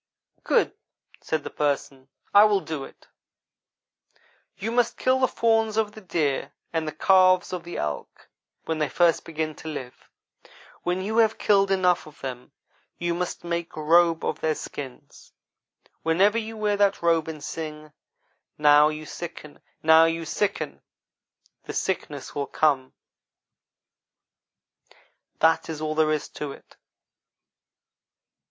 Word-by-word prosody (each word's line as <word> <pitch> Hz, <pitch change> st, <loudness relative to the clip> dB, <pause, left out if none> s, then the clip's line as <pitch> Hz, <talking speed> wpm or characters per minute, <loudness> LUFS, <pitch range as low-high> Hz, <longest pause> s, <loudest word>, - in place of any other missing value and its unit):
"'Good,' -, -, +2 dB, 0.5 s
said 160 Hz, -2 st, -2 dB
the -, -, -7 dB
Person, 140 Hz, -2 st, -2 dB, 0.3 s
'I 205 Hz, +1 st, +9 dB
will 205 Hz, -2 st, +3 dB
do 155 Hz, -5 st, -5 dB
it; -, -, -17 dB, 1.5 s
you 210 Hz, +4 st, -3 dB
must 240 Hz, 0 st, +1 dB
kill 260 Hz, 0 st, +2 dB
the 260 Hz, -, +4 dB
fawns 225 Hz, -2 st, +1 dB
of 220 Hz, -2 st, +1 dB
the 215 Hz, -, -12 dB
deer 160 Hz, -7 st, -1 dB, 0.2 s
and 160 Hz, -1 st, -1 dB
the -, -, -2 dB
calves 185 Hz, +1 st, +4 dB
of 180 Hz, -2 st, -4 dB
the 175 Hz, -, -7 dB
elk 75 Hz, -1 st, -5 dB, 0.4 s
when 160 Hz, -1 st, -2 dB
they 150 Hz, -2 st, 0 dB
first 170 Hz, +4 st, +3 dB
begin 160 Hz, -1 st, -3 dB
to -, -, -10 dB
live. 135 Hz, -5 st, -8 dB, 0.7 s
When 180 Hz, +1 st, -1 dB
you 220 Hz, +3 st, -2 dB
have 225 Hz, -1 st, +4 dB
killed 195 Hz, -1 st, +3 dB
enough 180 Hz, -4 st, +2 dB
of 150 Hz, -, -15 dB
them 125 Hz, -2 st, -7 dB, 0.5 s
you 175 Hz, 0 st, -1 dB
must 180 Hz, +1 st, -4 dB
make 170 Hz, 0 st, -3 dB
a 155 Hz, -, -5 dB
robe 165 Hz, +1 st, +4 dB
of 155 Hz, -, -2 dB
their 155 Hz, -1 st, +1 dB
skins. 135 Hz, -4 st, -9 dB, 0.7 s
Whenever 195 Hz, +7 st, +3 dB
you 225 Hz, 0 st, -6 dB
wear 210 Hz, -1 st, 0 dB
that 200 Hz, -3 st, +2 dB
robe 165 Hz, -2 st, +2 dB
and 155 Hz, -2 st, -7 dB
sing 155 Hz, -1 st, -6 dB, 0.6 s
"now 150 Hz, 0 st, +6 dB
you 155 Hz, 0 st, -6 dB
sicken, 155 Hz, -2 st, -8 dB, 0.2 s
now 160 Hz, +1 st, +7 dB
you 165 Hz, 0 st, -1 dB
sicken," 200 Hz, +6 st, -2 dB, 0.8 s
the -, -, -6 dB
sickness 150 Hz, -7 st, -3 dB
will 140 Hz, -1 st, -3 dB
come 135 Hz, -4 st, +1 dB, 2.5 s
that 160 Hz, 0 st, +2 dB
is 160 Hz, -2 st, -4 dB
all 155 Hz, 0 st, -2 dB
there 155 Hz, 0 st, +2 dB
is 155 Hz, -1 st, -1 dB
to 150 Hz, -2 st, -6 dB
it. -, -, -18 dB
165 Hz, 140 wpm, -25 LUFS, 150-195 Hz, 2.5 s, I